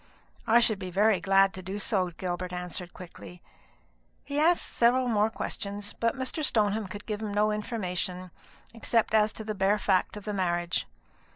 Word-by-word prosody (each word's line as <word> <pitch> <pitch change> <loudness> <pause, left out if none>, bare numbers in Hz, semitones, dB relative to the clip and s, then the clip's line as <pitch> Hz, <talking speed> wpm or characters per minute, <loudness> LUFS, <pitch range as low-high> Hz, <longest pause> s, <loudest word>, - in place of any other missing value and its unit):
"I 230 +2 +6
should 220 -4 +2
be 185 -2 -5
very 205 +2 +3
glad 195 0 +4
to 185 - -7
do 190 +3 -5
so," 195 -3 0
Gilbert 175 +1 -4
answered 180 0 -4
quickly. 180 0 -11 0.8
He 285 +1 -2
asked 340 +3 +3
several 250 +2 +3
more 215 -2 +2
questions; 205 -2 -5
but 230 +2 0
Mr. 260 +4 -3
Stoneham 215 -5 +1
could 205 +2 -8
give 210 -1 -4
him 215 -2 -3
no 210 +1 +3
information, 185 -4 -3 0.4
except 230 -1 0
as 215 0 +4
to 220 - -6
the 215 0 -3
bare 195 +1 +2
fact 195 0 +1
of 205 - -10
the 210 - -3
marriage. 175 -2 -1
205 Hz, 175 wpm, -28 LUFS, 185-220 Hz, 0.8 s, I